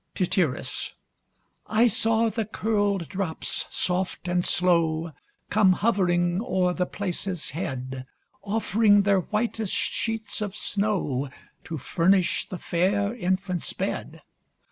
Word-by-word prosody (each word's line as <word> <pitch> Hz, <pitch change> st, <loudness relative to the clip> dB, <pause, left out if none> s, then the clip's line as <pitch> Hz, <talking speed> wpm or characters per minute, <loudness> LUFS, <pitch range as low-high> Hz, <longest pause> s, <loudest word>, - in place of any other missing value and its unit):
Tityrus. 175 Hz, -5 st, -1 dB, 0.7 s
I 225 Hz, +2 st, +4 dB
saw 225 Hz, 0 st, +3 dB
the 225 Hz, 0 st, -2 dB
curl'd 205 Hz, -4 st, 0 dB
drops, 185 Hz, -5 st, -2 dB
soft 190 Hz, -9 st, -1 dB
and 175 Hz, 0 st, +1 dB
slow 165 Hz, -3 st, +2 dB, 0.4 s
Come 205 Hz, -3 st, +5 dB
hovering 180 Hz, -3 st, +1 dB
o'er 185 Hz, -6 st, +1 dB
the 180 Hz, 0 st, -1 dB
place's 185 Hz, -2 st, -3 dB
head, 130 Hz, -4 st, -5 dB, 0.4 s
Offring 205 Hz, 0 st, +3 dB
their 200 Hz, -1 st, +3 dB
whitest 215 Hz, +1 st, -1 dB
sheets 225 Hz, -1 st, -1 dB
of 210 Hz, 0 st, -3 dB
snow, 190 Hz, -10 st, -1 dB, 0.4 s
To 165 Hz, -, -4 dB
furnish 180 Hz, +6 st, +2 dB
the 185 Hz, -, -5 dB
fair 200 Hz, +6 st, 0 dB
infant's 185 Hz, -3 st, -1 dB
bed. -, -, -4 dB
190 Hz, 110 wpm, -26 LUFS, 175-210 Hz, 0.7 s, Come